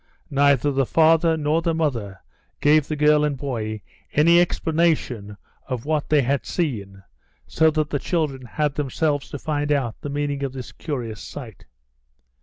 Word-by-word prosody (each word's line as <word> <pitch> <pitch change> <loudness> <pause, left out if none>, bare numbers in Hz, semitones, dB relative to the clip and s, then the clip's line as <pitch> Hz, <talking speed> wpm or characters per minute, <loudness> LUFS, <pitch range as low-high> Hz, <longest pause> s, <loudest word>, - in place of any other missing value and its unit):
Neither 140 0 +3
the 135 -2 +1
father 165 0 +4
nor 155 +2 +1
the 165 -1 0
mother 115 -12 -2 0.4
gave 150 0 +4
the 155 - -2
girl 150 0 +4
and 145 -2 0
boy 110 -6 -4 0.3
any 170 +3 +5
explanation 155 -12 0 0.3
of 125 -2 -4
what 155 -1 -1
they 150 -2 +4
had 140 +2 0
seen, 100 - -3 0.4
so 160 0 +3
that 155 -1 -1
the 145 - 0
children 140 -6 -2
had 150 +4 -1
themselves 145 +1 -1
to - - -5
find 145 0 -2
out 130 -6 -1
the 145 - -5
meaning 145 0 -2
of 135 -2 -3
this 130 -2 -7
curious 120 - -5
sight. 120 -8 -10
145 Hz, 160 wpm, -23 LUFS, 125-155 Hz, 0.4 s, any